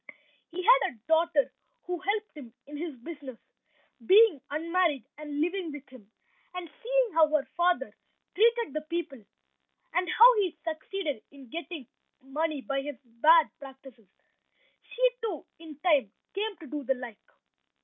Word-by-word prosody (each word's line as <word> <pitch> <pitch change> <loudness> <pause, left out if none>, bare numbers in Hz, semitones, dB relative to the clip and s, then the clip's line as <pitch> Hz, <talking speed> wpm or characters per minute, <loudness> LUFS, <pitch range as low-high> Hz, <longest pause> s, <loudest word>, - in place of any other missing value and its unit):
He 365 +2 -5
had 485 - +5
a - - -21
daughter 320 -2 +3 0.3
who 360 -1 -3
helped 415 +1 -2
him 260 -6 -10
in 295 - -10
his 315 -1 -5
business, 280 -4 -8 0.7
being 390 - +6
unmarried 325 -4 0
and 295 -1 -5
living 350 0 -1
with 290 -1 -9
him, 240 -6 -15 0.5
and 360 -1 -5
seeing - - +1
how 320 -1 +6
her 300 -2 +1
father 350 +1 +1 0.4
treated 465 - +3
the 305 - -2
people, 305 -6 -5 0.7
and 360 -1 +1
how 485 +2 +8
he 380 -5 0
succeeded 315 - -3
in 275 -3 -15
getting 335 -4 -6 0.3
money 295 +2 -2
by 275 0 -2
his 290 0 -5
bad 300 +8 +5
practices, 265 -5 -13 0.8
she, - - +3
too, 410 -9 -4
in 315 -3 -11
time 295 - +3 0.2
came 415 +1 -2
to - - -9
do 295 +1 -5
the 265 +1 +1
like. 245 -4 -8
315 Hz, 150 wpm, -29 LUFS, 275-360 Hz, 0.8 s, how